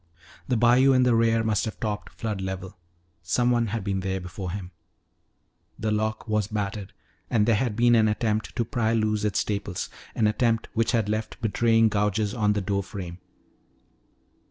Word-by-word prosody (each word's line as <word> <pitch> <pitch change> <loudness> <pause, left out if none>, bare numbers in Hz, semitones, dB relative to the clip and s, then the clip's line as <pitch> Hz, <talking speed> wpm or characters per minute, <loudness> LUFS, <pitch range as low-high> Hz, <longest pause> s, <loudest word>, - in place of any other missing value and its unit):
The 125 - +1
bayou 125 +4 +5
in 130 -1 +4
the 125 -1 +3
rear 115 0 +3
must 110 -2 +1
have 110 - -6
topped 105 -2 -3
flood 105 -4 -4
level. 95 0 -5 0.5
Someone 120 +5 +1
had 110 0 -3
been 95 -1 -1
there 95 0 -2
before 90 +1 -6
him. 90 0 -6 1.1
The 110 -1 -1
lock 110 +2 -1
was 105 -2 0
battered 105 -2 -4 0.4
and 105 -3 +3
there 115 - +3
had 110 0 0
been 120 +1 +4
an 110 -2 +5
attempt 110 0 -1
to 115 - 0
pry 115 -4 0
loose 110 -2 +1
its 105 - 0
staples, 100 -3 -2 0.3
an 110 - +2
attempt 115 +1 +1
which 115 0 +1
had 115 -3 +2
left 110 +1 -3
betraying 115 0 +3
gouges 105 0 0
on 105 -2 +2
the 105 - -1
door 100 +1 -1
frame. 95 -2 -7
110 Hz, 175 wpm, -26 LUFS, 100-115 Hz, 1.1 s, bayou